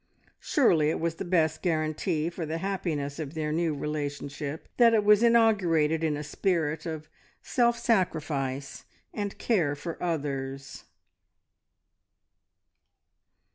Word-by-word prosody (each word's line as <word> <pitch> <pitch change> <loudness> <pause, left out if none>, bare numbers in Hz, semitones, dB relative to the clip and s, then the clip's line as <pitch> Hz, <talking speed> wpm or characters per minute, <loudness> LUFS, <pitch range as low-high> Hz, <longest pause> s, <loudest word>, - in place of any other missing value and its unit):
Surely 165 - +3
it - - -1
was 165 0 -2
the - - -4
best 160 -4 +1
guarantee 155 -1 0
for 170 0 -5
the 160 +1 -3
happiness 165 -6 -3
of 155 0 -5
their 155 -1 -2
new 160 -1 0
relationship, 145 0 -4
that 235 -2 +6
it 215 - +3
was 210 0 +6
inaugurated 185 -10 +3
in 155 -2 0
a 150 - -5
spirit 160 0 -1
of 155 -1 -5 0.4
self 240 -1 +2
sacrifice 145 - -1 0.3
and 205 -2 -4
care 170 -11 +1
for 165 +3 -7
others. 140 -5 -4
160 Hz, 120 wpm, -28 LUFS, 150-185 Hz, 0.4 s, that